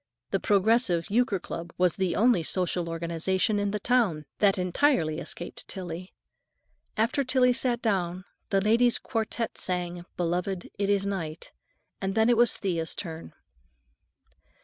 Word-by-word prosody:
The - - +1
Progressive 200 -4 +2
Euchre 225 -3 +2
Club 170 0 -7
was 180 -2 +3
the 190 -3 0
only 230 -4 +4
social 175 0 -1
organization 170 +5 0
in 205 0 0
the 210 +1 -2
town 200 -10 +1
that 200 -2 +4
entirely 180 - +1
escaped 175 - -6
Tillie. 180 -1 -6 0.9
After 230 +6 +1
Tillie 255 -1 +3
sat 245 -1 +1
down, 185 -4 -1 0.2
the 195 -1 +2
Ladies' 230 +4 +4
Quartette 230 -1 -3
sang, 175 -1 -2
"Beloved, 180 +2 -2
it 200 -1 0
is 200 -1 +2
Night," 170 -6 -4 0.5
and 195 0 -2
then 220 +1 +4
it 240 - +4
was 240 0 +4
Thea's 170 -4 -2
turn. 165 -3 -7
190 Hz, 140 wpm, -27 LUFS, 175-225 Hz, 0.9 s, only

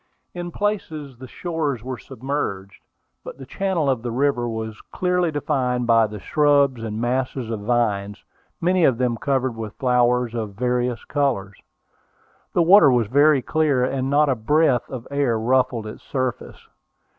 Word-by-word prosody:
In 175 0 -5
places 160 - -3
the 130 - -9
shores 150 -6 -3
were 130 -1 -5
submerged, 110 -7 -5 0.4
but - - -9
the 135 - -10
channel 185 0 -1
of 130 -4 +1
the 120 - -4
river 120 -1 0
was 110 -1 -5
clearly 180 -1 0
defined 130 -5 -1
by 115 -1 +4
the 105 0 -8
shrubs 140 -1 +2
and 110 -1 -4
masses 125 0 -2
of 110 - -3
vines, 105 -2 -1 0.4
many 180 +1 +2
of 130 -6 +4
them 125 -1 0
covered 130 -1 -1
with 110 -2 -7
flowers 125 -2 +2
of 110 -4 -4
various 125 +1 -1
colors. 120 -10 -2 0.9
The 175 - +3
water 185 -2 +7
was 120 -2 +2
very 140 +4 +4
clear, 150 -4 +1
and 130 0 -2
not 145 +2 +3
a 135 - +3
breath 130 +3 +1
of 125 -3 -7
air 140 -5 +1
ruffled 125 0 +1
its 110 - -8
surface. 130 -3 -4
130 Hz, 155 wpm, -22 LUFS, 115-145 Hz, 0.9 s, water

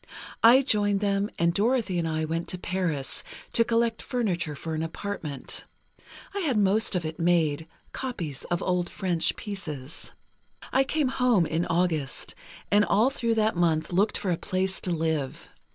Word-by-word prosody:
I 245 +4 +7
joined 205 -5 +2
them, 200 0 +1
and 170 0 +2
Dorothy 215 -3 +1
and 165 - -1
I 160 0 -1
went 165 +2 -2
to 185 - -3
Paris, 175 -7 -3 0.3
to 230 - +5
collect 230 0 +1
furniture 180 -11 -1
for 160 +3 -5
an 155 - -1
apartment. 160 -4 -4 0.7
I 400 - -2
had 290 - +1
most 205 +1 +3
of 175 -2 -1
it 155 0 -5
made, 165 -3 +2 0.2
copies 175 - -4
of 175 - -1
old 180 -1 0
French 175 -4 0
pieces. 160 - -6 0.6
"I 265 - +5
came 290 -1 +1
home 245 -9 +3
in 160 +2 -1
August, 165 -5 0 0.4
and 205 +1 +5
all 220 +6 +3
through 235 -4 0
that 220 -1 +2
month 170 -1 +1
looked 200 +4 +2
for 190 - -1
a 170 - +1
place 190 +2 -1
to 180 - 0
live. 160 -5 -2
180 Hz, 165 wpm, -27 LUFS, 165-215 Hz, 0.7 s, I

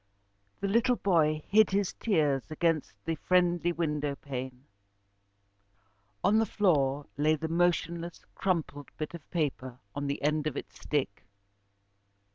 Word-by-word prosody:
The 200 - 0
little 235 +5 +3
boy 155 -7 +2
hid 215 +2 +5
his 195 -1 0
tears 150 - +1
against 155 -1 0
the 165 - 0
friendly 175 0 +2
window 150 -4 -1
pane. 130 -1 -7 1.6
On 215 +2 +4
the 225 - +3
floor 145 -8 +2
lay 155 +2 +3
the 160 +1 -4
motionless, 170 0 0
crumpled 160 -6 -2
bit 155 +1 -4
of 170 -4 -10
paper 130 -6 -2 0.2
on 145 0 -3
the 140 - -2
end 150 +1 +1
of 145 - -3
its - - -8
stick. 130 -11 -2
155 Hz, 130 wpm, -30 LUFS, 145-175 Hz, 1.6 s, hid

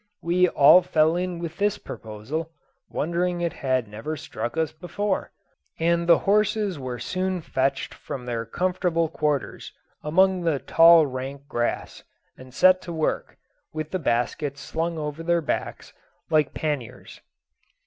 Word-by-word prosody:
We 180 +1 +3
all 150 +5 +7
fell 160 -1 +2
in 180 0 -2
with 170 -1 -6
this 205 0 +1
proposal, 115 +10 -6 0.4
wondering 175 +2 -1
it 170 -1 -1
had 130 -4 -1
never 110 +10 -5
struck 120 0 -5
us 160 -1 0
before, 190 +4 -3 0.5
and 170 +1 +1
the 170 - +8
horses 210 -3 +1
were 130 -2 -5
soon 185 +8 -2
fetched 135 -3 -1
from 125 -2 -7
their 120 -2 -2
comfortable 175 +4 0
quarters 150 -3 -2 0.3
among 185 +4 +3
the 165 -4 +1
tall 165 +3 +6
rank 135 +1 -6
grass, 120 -5 -3 0.3
and 130 0 -13
set 185 +7 +5
to 175 - -7
work, 160 -2 -2 0.4
with 155 0 -5
the 185 - -1
baskets 140 +2 -1
slung 165 +4 -3
over 150 +1 -4
their 170 +1 +2
backs, 160 - -4 0.4
like 155 -3 +2
panniers. 145 -7 -4
160 Hz, 140 wpm, -25 LUFS, 140-175 Hz, 0.5 s, the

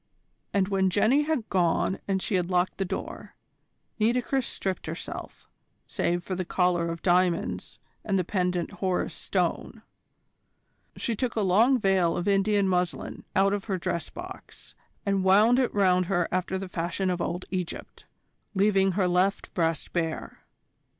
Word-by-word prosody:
And 195 -2 +2
when 190 -1 +2
Jenny 220 +9 +3
had 305 -8 -1
gone 180 +1 +1
and 190 -1 0
she - - -2
had 180 -2 +1
locked 180 +1 0
the 195 - +1
door, - - -6 0.6
Nitocris 245 +3 +1
stripped 190 -4 -3
herself, 160 +2 -7 0.4
save 175 0 -1
for 185 - -4
the 185 0 -2
collar 175 -1 +1
of 165 0 -6
diamonds 180 -1 +1 0.3
and 200 -2 0
the 185 - +1
pendant 180 -1 -1
Horus 190 -2 -1
Stone. - - -2 1.1
She 230 - -1
took 245 +2 -2
a 220 - +1
long 220 +8 +4
veil 190 -6 +2
of 175 - -2
Indian 200 0 +3
muslin 180 -1 -2
out 195 +1 +4
of 205 -1 -2
her 195 -4 -1
dress 170 -1 -3
box 365 +2 -11 0.3
and 195 -1 +1
wound 210 +6 +5
it 255 - +1
round 185 -3 +3
her 175 -3 +1
after 185 +1 -1
the 190 0 -5
fashion 180 +2 -2
of 175 -1 -2
old 175 +2 -3
Egypt, 180 -3 -5 0.5
leaving 195 -1 +3
her 190 0 +1
left 180 +2 +1
breast 165 -2 -1
bare. 165 -2 -3
190 Hz, 155 wpm, -27 LUFS, 180-200 Hz, 1.1 s, wound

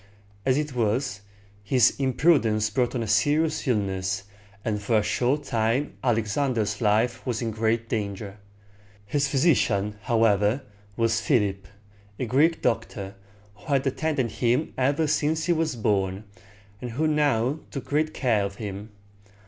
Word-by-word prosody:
As 130 0 +3
it 150 -2 -2
was, 120 -1 -1 0.4
his 125 +4 +4
imprudence 125 -6 +2
brought 125 +3 0
on 120 - -1
a - - -5
serious 150 +9 +1
illness, 95 -4 -1 0.4
and 105 -3 -1
for 110 +2 +2
a 105 - +2
short 130 +7 0
time 120 +2 0
Alexander's 115 -2 0
life 115 +3 +1
was 120 -4 -2
in 115 -2 -2
great 115 +1 0
danger. 100 -2 -4 0.7
His 140 +6 0
physician, 120 - +2
however, 110 +2 +2 0.3
was 115 -1 +1
Philip, 100 -7 0 0.5
a 130 - -2
Greek 150 +8 +2
doctor, 110 -4 -2 0.4
who - - -20
had 140 -3 +1
attended 135 -3 -1
him 125 +5 0
ever 140 +5 +1
since 155 +1 0
he 175 - +3
was 160 -4 -1
born, 100 -3 0 0.6
and 120 -2 -5
who 155 +6 0
now 145 -3 +1
took 135 - -6
great 155 +2 0
care 115 -9 +1
of 100 0 -4
him. 105 0 -6
120 Hz, 140 wpm, -25 LUFS, 105-140 Hz, 0.7 s, his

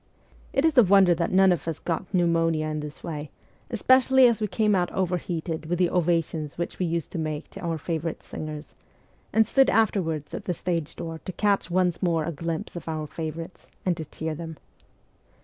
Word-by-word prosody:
It 275 - +2
is 320 -2 +3
a - - +9
wonder 190 -2 +6
that 170 0 -1
none 190 0 +6
of 170 -3 -1
us 165 -2 -2
got 175 +2 -3
pneumonia 165 -3 +2
in 155 0 -2
this 150 -1 -8
way, 150 -3 -5 0.4
especially 260 +3 +5
as 235 -2 +3
we 210 - +1
came 210 +2 +1
out 180 -2 +1
overheated 170 -3 -2
with 175 +2 0
the 180 -1 +2
ovations 165 -3 0
which 170 - -4
we 180 - +1
used 165 -2 -2
to - - -4
make 155 -1 -4
to - - -9
our 165 -2 -2
favourite 165 0 -3
singers, 155 0 -7 0.6
and 220 0 +4
stood 270 +4 +4
afterwards 180 -9 +1
at - - -5
the 180 - -1
stage 165 -4 -2
door 165 -1 -6
to 185 - -3
catch 200 0 +1
once 180 -1 +1
more 165 -4 +1
a 170 - -2
glimpse 165 +2 -4
of 175 - -7
our 155 -1 -2
favourites, 165 +3 -6 0.2
and 180 -2 +2
to 160 - -5
cheer 160 +2 -4
them. 160 0 -7
170 Hz, 200 wpm, -26 LUFS, 160-185 Hz, 0.6 s, a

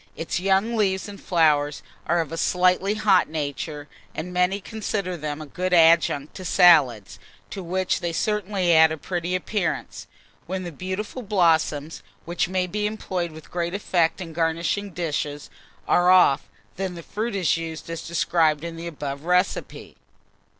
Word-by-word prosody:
Its 165 - -3
young 195 +5 +1
leaves 190 -3 0
and 200 -1 -10
flowers 150 -4 +2 0.2
are 170 0 +2
of 160 -2 -6
a - - -3
slightly 185 +4 +2
hot 210 -4 +3
nature, 145 -1 -4 0.3
and 180 +3 -5
many 180 +2 +1
consider 200 -3 -4
them 150 -2 -5
a 155 - -7
good 180 +5 -3
adjunct 160 -3 +4
to 185 - -9
salads, 155 - +4 0.3
to 195 - -5
which 185 +1 -1
they 170 -1 -2
certainly 195 -1 0
add 160 0 +6
a 160 - -3
pretty 175 +2 -3
appearance. 185 0 -3 0.4
When 185 +1 -3
the 175 - -6
beautiful 190 - -5
blossoms, 165 -7 +1 0.2
which 175 +1 -1
may 185 -1 0
be 210 +3 -2
employed 185 -5 -3
with 155 0 -13
great 175 +1 -2
effect 175 -5 +1
in 165 -3 -7
garnishing 170 +5 -1
dishes, 150 -4 -4 0.4
are 175 0 +4
off, 180 -7 +5 0.3
then 190 -1 -3
the 170 - -9
fruit 215 +4 -4
is 180 -6 +2
used 165 -1 -6
as 165 0 -5
described 165 -2 +1
in 170 -1 -6
the 170 +1 -6
above 145 -3 -6
recipe. 180 +2 -1
175 Hz, 160 wpm, -24 LUFS, 160-190 Hz, 0.4 s, add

